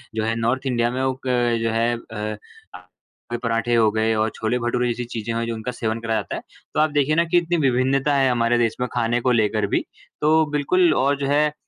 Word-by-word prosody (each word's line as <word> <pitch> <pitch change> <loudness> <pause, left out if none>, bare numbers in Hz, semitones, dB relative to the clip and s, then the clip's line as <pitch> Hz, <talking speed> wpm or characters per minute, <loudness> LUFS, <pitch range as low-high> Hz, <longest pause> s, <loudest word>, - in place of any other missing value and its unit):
जो 110 - -1
है 115 +1 0
north 120 +4 -1
India 120 -2 +1
में 130 +1 -2
वो 130 - +1
क 120 -2 +1
जो 115 - 0
है 115 +1 +1
अ, 110 -2 -6 0.9
कोई 120 - -2
पराठे 115 0 -1
हो 110 -2 +4
गए 110 +1 +1
और 110 +1 +1
छोले-भटूरे 120 +2 -1
जैसी 120 +1 -2
चीज़ें 115 -1 -4
हैं 115 0 -1
जो 115 - -2
उनका 110 +3 -4
सेवन 115 -2 -3
कराया 115 -1 0
जाता - - -6
है। - - -5 0.3
तो - - 0
आप 155 - +4
देखिए 145 +1 +2
ना 170 - +4
कि 170 +1 +2
इतनी 175 0 +1
विभिन्नता 135 +1 +2
है, 135 -1 +3
हमारे 120 0 +2
देश 115 -2 +1
में 125 - 0
खाने 120 0 +1
को 125 +1 +2
लेकर 110 -2 +2
भी, - - +1 0.4
तो 155 +1 +4
बिल्कुल 165 +4 +3
और 140 +1 +1
जो 140 - -2
है 145 +2 +3
अ, 150 - -16
120 Hz, 235 wpm, -22 LUFS, 115-135 Hz, 0.9 s, हो